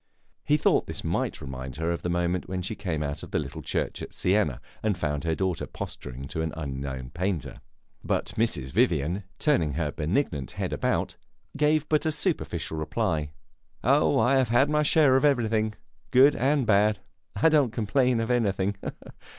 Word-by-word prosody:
He 150 Hz, -, +3 dB
thought 150 Hz, -, +2 dB
this -, -, -5 dB
might -, -, -2 dB
remind 65 Hz, -1 st, -6 dB
her 80 Hz, +3 st, -1 dB
of 85 Hz, -, -3 dB
the 90 Hz, -, -2 dB
moment 85 Hz, +1 st, -1 dB
when 90 Hz, -1 st, -3 dB
she 95 Hz, -, -3 dB
came 85 Hz, -8 st, -3 dB
out 70 Hz, 0 st, -4 dB
of -, -, -9 dB
the -, -, -1 dB
little -, -, -4 dB
church -, -, -2 dB
at -, -, -7 dB
Siena 90 Hz, -, +1 dB, 0.2 s
and 105 Hz, -4 st, 0 dB
found 75 Hz, -2 st, -2 dB
her 80 Hz, -1 st, +1 dB
daughter 95 Hz, -1 st, -1 dB
posturing 65 Hz, +2 st, -7 dB
to 80 Hz, -, -3 dB
an 80 Hz, -1 st, -2 dB
unknown 70 Hz, -3 st, -5 dB
painter. 90 Hz, -1 st, -3 dB, 0.4 s
But -, -, -1 dB
Mrs. 75 Hz, -, 0 dB
Vivian, 85 Hz, +7 st, +1 dB
turning 85 Hz, -, +2 dB
her 75 Hz, -1 st, -1 dB
benignant 75 Hz, -, -1 dB
head -, -, -3 dB
about, -, -, -1 dB, 0.4 s
gave 150 Hz, +1 st, +2 dB
but 155 Hz, 0 st, +2 dB
a -, -, +2 dB
superficial 150 Hz, -, -2 dB
reply. 75 Hz, -1 st, -1 dB, 0.5 s
"Oh, 80 Hz, -1 st, +4 dB
I 125 Hz, +5 st, +4 dB
have 130 Hz, -3 st, +2 dB
had 135 Hz, +5 st, +3 dB
my 150 Hz, 0 st, +3 dB
share 150 Hz, -2 st, +5 dB
of 135 Hz, -, 0 dB
everything, 110 Hz, -6 st, +2 dB, 0.3 s
good 135 Hz, +3 st, +6 dB
and 135 Hz, +1 st, +2 dB
bad. 105 Hz, 0 st, +4 dB, 0.4 s
I 110 Hz, +11 st, +4 dB
don't 150 Hz, -5 st, +4 dB
complain 120 Hz, +2 st, +1 dB
of 115 Hz, +2 st, -1 dB
anything." 100 Hz, -4 st, +1 dB
100 Hz, 175 wpm, -27 LUFS, 80-130 Hz, 0.5 s, good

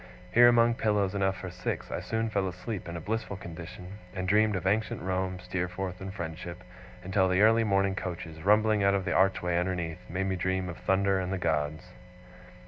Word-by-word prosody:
Here, 120 Hz, +5 st, +8 dB
among 120 Hz, -1 st, +5 dB
pillows 105 Hz, -4 st, +1 dB
enough 95 Hz, -1 st, 0 dB
for 90 Hz, -2 st, -6 dB
six, 90 Hz, 0 st, -4 dB
I -, -, -2 dB
soon 110 Hz, 0 st, -2 dB
fell 100 Hz, -2 st, 0 dB
asleep 90 Hz, +1 st, -5 dB
in 85 Hz, -, -5 dB
a -, -, -4 dB
blissful 105 Hz, +2 st, -3 dB
condition, 90 Hz, +3 st, -9 dB, 0.2 s
and 95 Hz, -1 st, -3 dB
dreamed 105 Hz, +2 st, +3 dB
of 95 Hz, -, -3 dB
ancient 105 Hz, +3 st, +1 dB
Rome, 95 Hz, 0 st, -1 dB
Steerforth, 90 Hz, 0 st, -4 dB
and 95 Hz, 0 st, -5 dB
friendship, 85 Hz, -1 st, -6 dB, 0.4 s
until 95 Hz, +1 st, +2 dB
the 95 Hz, +3 st, +3 dB
early 115 Hz, +1 st, +5 dB
morning 100 Hz, -2 st, +2 dB
coaches, 85 Hz, -4 st, -6 dB
rumbling 105 Hz, +2 st, +4 dB
out 100 Hz, 0 st, +4 dB
of 95 Hz, -2 st, -1 dB
the -, -, 0 dB
archway 90 Hz, -2 st, +2 dB
underneath, 90 Hz, -3 st, -2 dB
made 95 Hz, +2 st, -1 dB
me 95 Hz, -1 st, 0 dB
dream 95 Hz, +1 st, -1 dB
of 85 Hz, -, -7 dB
thunder 95 Hz, 0 st, +2 dB
and 90 Hz, 0 st, -3 dB
the 95 Hz, -, -1 dB
gods. 80 Hz, +1 st, -1 dB
95 Hz, 195 wpm, -29 LUFS, 90-100 Hz, 0.4 s, Here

